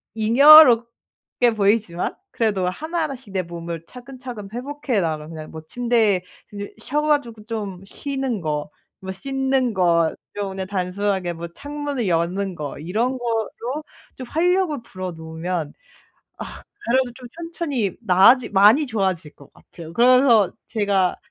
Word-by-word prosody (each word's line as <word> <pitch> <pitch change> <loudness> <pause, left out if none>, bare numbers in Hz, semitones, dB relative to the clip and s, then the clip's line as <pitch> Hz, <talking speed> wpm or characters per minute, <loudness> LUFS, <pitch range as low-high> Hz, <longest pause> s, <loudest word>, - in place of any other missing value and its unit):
잉여롭게 240 0 +5
보이지만 200 -4 0 0.2
그래도 205 -5 0
하나하나씩 290 - -4
내 190 - +1
몸을 170 -1 -7
차근차근 250 -4 -9
회복해 265 -1 -2
나가면 155 -2 -3
그냥 155 -2 -8
뭐 160 - -8
침대에 230 -5 +1 0.3
그 205 -1 -7
쉬어 290 +6 -1
가지고 285 -8 0
좀 205 -5 -5
쉬는 270 -6 -3
거, 150 -2 -3 0.3
뭐 190 0 -5
씻는 265 +3 -1
것 170 -4 +2 0.2
좀 205 -1 -3
그냥 190 0 -5
단순하게 190 -1 -1
뭐 170 +1 -7
창문을 285 +4 -4
여는 180 +3 -1
거 150 -3 -6
이런 220 - -1
거로 240 +4 -3 0.3
좀 255 - -7
활력을 350 0 +1
불어 185 -4 -6
넣으면 160 +1 -4
아 - - -25 1.0
그래도 255 -1 +2
좀 250 -1 -11
천천히 330 - -3
나아지 220 +4 +5
많이 210 +9 +5
좋아질 190 - -2
것 140 - -17
같아요. 165 -1 -13
그러면서 240 -2 +5 0.2
제가 200 -4 +1
215 Hz, 285 characters per minute, -22 LUFS, 180-255 Hz, 1.0 s, 잉여롭게